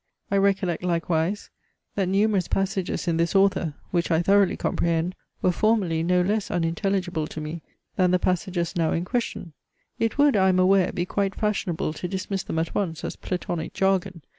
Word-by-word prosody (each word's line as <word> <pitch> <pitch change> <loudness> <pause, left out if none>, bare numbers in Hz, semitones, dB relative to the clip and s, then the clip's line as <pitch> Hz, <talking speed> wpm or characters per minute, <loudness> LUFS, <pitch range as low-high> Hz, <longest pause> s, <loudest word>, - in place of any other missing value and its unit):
I 200 - +3
recollect 195 -3 +1
likewise, 170 +2 -1 0.4
that 195 -3 0
numerous 200 -1 +2
passages 195 -2 -1
in 165 -1 +1
this 170 +3 0
author, 190 -6 +2 0.2
which 175 -1 0
I 165 0 +2
thoroughly 200 +1 +4
comprehend, 170 +1 0 0.3
were 185 - +4
formerly 190 -5 +1
no 180 +1 +2
less 205 +2 0
unintelligible 175 -1 -1
to 155 - -7
me, 155 +2 -5 0.4
than 185 -1 +4
the 180 - +4
passages 180 -1 -1
now 165 -2 +1
in 170 +1 -1
question. 230 - -3 0.5
It 225 +3 0
would, 285 -2 +5
I 190 -1 +4
am 185 - +3
aware, 185 0 +4
be 175 - -2
quite 195 +1 -1
fashionable 195 -7 -1
to 180 - -5
dismiss 190 +1 -3
them 160 - -5
at 160 0 -1
once 170 -6 -2
as - - -4
Platonic 175 -3 -4
jargon. 190 -3 0
180 Hz, 175 wpm, -25 LUFS, 170-195 Hz, 0.5 s, would